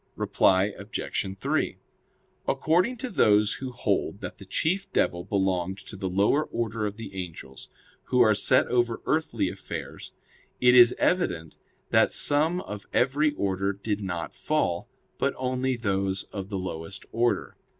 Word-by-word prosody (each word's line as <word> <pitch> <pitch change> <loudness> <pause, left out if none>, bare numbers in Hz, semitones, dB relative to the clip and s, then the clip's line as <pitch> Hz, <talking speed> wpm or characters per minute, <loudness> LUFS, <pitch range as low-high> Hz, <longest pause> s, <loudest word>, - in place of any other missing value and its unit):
Reply 95 +2 +2
Obj. 100 -1 -3
3: - - 0 0.7
According 185 +10 +2
to 255 +1 -5
those 105 - +4
who 130 -1 -6
hold 100 -4 -1
that - - -7
the 100 - -12
chief 185 - -1
devil 85 0 +1
belonged 95 -1 0
to - - -8
the 95 -1 -3
lower 100 +11 +2
order 110 -2 -2
of 105 +1 -7
the 110 -4 -8
angels, 85 -8 -8 0.4
who 125 - +1
are 110 -3 +6
set 130 +5 +4
over 120 -2 0
earthly 160 0 0
affairs, - - -7 0.5
it 125 0 +5
is 120 -1 +8
evident 85 - 0 0.4
that - - +4
some 160 +5 +3
of 105 - -8
every 145 +4 +2
order 95 -2 0
did 100 +1 -3
not 85 -4 -4
fall, 90 - -1 0.3
but - - 0
only 130 0 -1
those 95 -3 -1
of 95 -1 -5
the 100 - -3
lowest 90 0 -6
order. 120 +2 0
105 Hz, 150 wpm, -27 LUFS, 95-130 Hz, 0.7 s, is